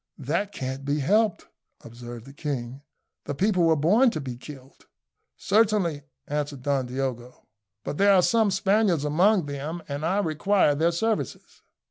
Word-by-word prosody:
"That 170 +9 -2
can't 130 -4 -5
be 145 +1 -1
helped," 210 +7 +1 0.4
observed 120 0 -10
the 135 - -12
king. 135 -3 -5 0.4
"The 145 - -4
people 185 0 +2
were 165 -1 +4
born 205 - +4
to 160 - -4
be 130 -4 -6
killed." 135 +1 -13 0.5
"Certainly," 200 -7 +1 0.3
answered 145 -2 -3
Don 135 -2 0
Diogo; 125 -1 -5 0.4
"but 145 - -5
there 200 0 +5
are 180 - +4
some 225 0 +3
Spaniards 190 -4 +1
among 180 +5 +3
them, 145 +4 -5
and 140 +1 -5
I 180 +5 +1
require 190 -1 +2
their 160 +4 +1
services." 220 +6 -3
150 Hz, 150 wpm, -25 LUFS, 135-195 Hz, 0.5 s, there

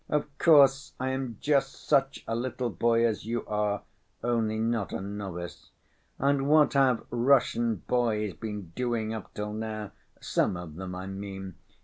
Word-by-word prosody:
Of 150 -1 -1
course 140 -4 +5
I 130 +1 -1
am 130 -4 -3
just 140 -2 0
such 135 0 +2
a 115 - -1
little 120 0 -2
boy 115 +5 +3
as 110 -4 0
you 115 +1 -2
are, 105 -1 -1 0.4
only 115 -2 +1
not 115 -2 0
a - - -3
novice. 95 -3 -6 0.5
And 140 0 +1
what 155 0 +5
have 135 -4 +3
Russian 120 -4 +2
boys 110 -5 +1
been 105 -5 -6
doing 115 -3 -1
up 110 -3 -7
till 105 0 -3
now, 110 -1 -4 0.3
some 90 - 0
of 90 -3 -8
them, 90 +2 -6
I 95 +1 -5
mean? 95 -1 -6
115 Hz, 155 wpm, -28 LUFS, 105-130 Hz, 0.5 s, course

